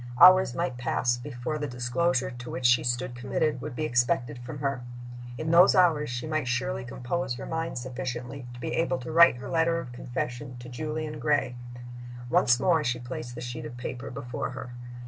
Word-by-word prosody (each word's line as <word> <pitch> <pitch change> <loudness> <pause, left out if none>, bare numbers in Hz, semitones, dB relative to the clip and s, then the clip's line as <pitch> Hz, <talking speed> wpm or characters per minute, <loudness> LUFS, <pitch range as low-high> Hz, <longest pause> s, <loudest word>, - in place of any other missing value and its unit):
Hours 185 -7 +8
might 150 -8 -2
pass 120 0 +1
before 130 +3 -4
the 145 - -2
disclosure 130 +3 0
to 120 0 -8
which 125 - -4
she 120 0 +5
stood 125 +1 -1
committed 130 +3 -1
would 140 -1 -6
be 155 - -1
expected 120 -1 +1
from 125 +5 -7
her. 140 -2 -1 0.6
In 155 0 -2
those 175 +3 +7
hours 165 -5 +4
she 120 0 -4
might 155 -4 -1
surely 130 +2 -1
compose 125 +2 -3
her - - -7
mind 165 -2 -3
sufficiently 125 0 -5
to - - -10
be - - -3
able 135 -6 +1
to 130 +4 -7
write 170 -5 +7
her 130 - -8
letter 165 0 +2
of 125 - -7
confession 125 +1 -5
to 120 0 -10
Julian 155 +3 -4
Gray. 145 -5 +1 0.8
Once 125 0 +4
more 165 -1 +3
she 125 -2 0
placed 120 0 -6
the - - -6
sheet 120 -1 -5
of 120 - -10
paper 125 +2 -5
before 125 -2 -4
her. 130 -1 -7
130 Hz, 190 wpm, -28 LUFS, 120-155 Hz, 0.8 s, Hours